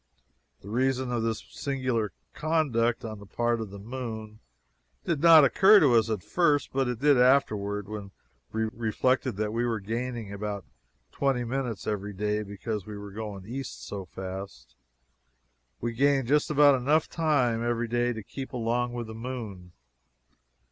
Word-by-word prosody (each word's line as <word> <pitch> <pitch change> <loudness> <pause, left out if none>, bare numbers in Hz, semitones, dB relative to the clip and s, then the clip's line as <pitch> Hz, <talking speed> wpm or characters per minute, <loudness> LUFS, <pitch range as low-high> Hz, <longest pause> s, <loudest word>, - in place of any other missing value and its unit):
The 100 - -11
reason 130 +2 0
of 120 -1 0
this 110 -1 -2
singular 130 -6 -1 0.2
conduct 125 -8 +1
on 110 -2 -6
the 100 - -12
part 120 +2 0
of 110 - -5
the 100 - -9
moon 110 -1 -6 0.7
did 160 -4 0
not 165 -2 +9
occur 200 +9 +7
to 140 -8 +4
us 115 -1 +4
at 105 -4 -2
first, 150 -5 +1
but 135 -1 +1
it 125 -1 -2
did 140 +1 +4
afterward 105 -6 +2
when 105 -2 -6 0.4
we 110 0 -1
reflected 120 +2 0
that 105 +1 -2
we 115 +1 0
were 115 -2 0
gaining 115 0 -4
about 100 -1 -4 0.5
twenty 135 -3 0
minutes 120 -3 -3
every 105 -1 -3
day 105 +2 -1
because 105 0 -5
we 105 -1 -6
were 100 0 -8
going 105 -2 -6
east 130 +4 -6
so 100 -2 -6
fast 95 -7 -8 1.1
we 120 0 -2
gained 135 0 +2
just 150 +3 +2
about 145 -1 +6
enough 145 +5 +2
every 120 -6 +1
day 120 +1 +1
to 110 -3 -6
keep 135 +6 -7
along 120 0 -1
with 120 -1 -4
the 110 - -8
moon. 110 -7 -6
115 Hz, 160 wpm, -28 LUFS, 105-130 Hz, 1.1 s, not